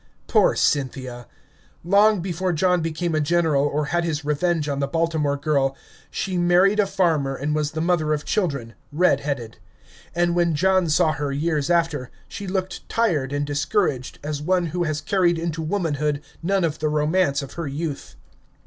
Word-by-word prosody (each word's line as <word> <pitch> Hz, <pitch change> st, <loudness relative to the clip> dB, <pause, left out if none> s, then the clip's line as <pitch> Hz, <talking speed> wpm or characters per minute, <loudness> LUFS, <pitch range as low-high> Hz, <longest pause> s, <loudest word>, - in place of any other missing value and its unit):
Poor -, -, +3 dB
Cynthia! 130 Hz, -3 st, -1 dB, 0.6 s
Long 200 Hz, +2 st, +4 dB
before 180 Hz, 0 st, -2 dB
John 180 Hz, +2 st, +2 dB
became 165 Hz, +1 st, -2 dB
a 155 Hz, -, +1 dB
general 160 Hz, -2 st, +2 dB
or 145 Hz, +1 st, -1 dB
had 175 Hz, 0 st, +2 dB
his 160 Hz, -3 st, -2 dB
revenge 150 Hz, +1 st, 0 dB
on 140 Hz, -1 st, -2 dB
the 140 Hz, -, 0 dB
Baltimore 160 Hz, -2 st, 0 dB
girl, 140 Hz, -2 st, 0 dB, 0.3 s
she 185 Hz, -2 st, -2 dB
married 180 Hz, +4 st, +4 dB
a 205 Hz, -, +3 dB
farmer 165 Hz, -8 st, +1 dB
and 145 Hz, +3 st, -2 dB
was 150 Hz, 0 st, -1 dB
the 160 Hz, -, -2 dB
mother 165 Hz, -3 st, +1 dB
of 150 Hz, -1 st, -1 dB
children, 140 Hz, -, -1 dB, 0.2 s
red 150 Hz, -2 st, +3 dB
headed; 140 Hz, -6 st, -4 dB, 0.6 s
and 175 Hz, 0 st, +2 dB
when 170 Hz, -2 st, +2 dB
John 185 Hz, +1 st, +2 dB
saw 155 Hz, +1 st, +3 dB
her 145 Hz, -1 st, -3 dB
years 150 Hz, +1 st, -1 dB
after, 165 Hz, -7 st, +1 dB, 0.2 s
she 200 Hz, -, -7 dB
looked 185 Hz, 0 st, -4 dB
tired 165 Hz, -13 st, +1 dB
and 145 Hz, 0 st, -1 dB
discouraged, 145 Hz, -, -1 dB
as 145 Hz, -1 st, -3 dB
one 180 Hz, +2 st, +1 dB
who 175 Hz, -1 st, 0 dB
has 155 Hz, -1 st, -2 dB
carried 180 Hz, -3 st, +2 dB
into 165 Hz, -1 st, -3 dB
womanhood 150 Hz, -4 st, -1 dB, 0.2 s
none 190 Hz, +2 st, +1 dB
of 155 Hz, -2 st, -1 dB
the 155 Hz, -, 0 dB
romance 150 Hz, -1 st, +1 dB
of 135 Hz, -, -9 dB
her 170 Hz, -3 st, -4 dB
youth. 145 Hz, +1 st, -5 dB
155 Hz, 175 wpm, -23 LUFS, 145-175 Hz, 0.6 s, Long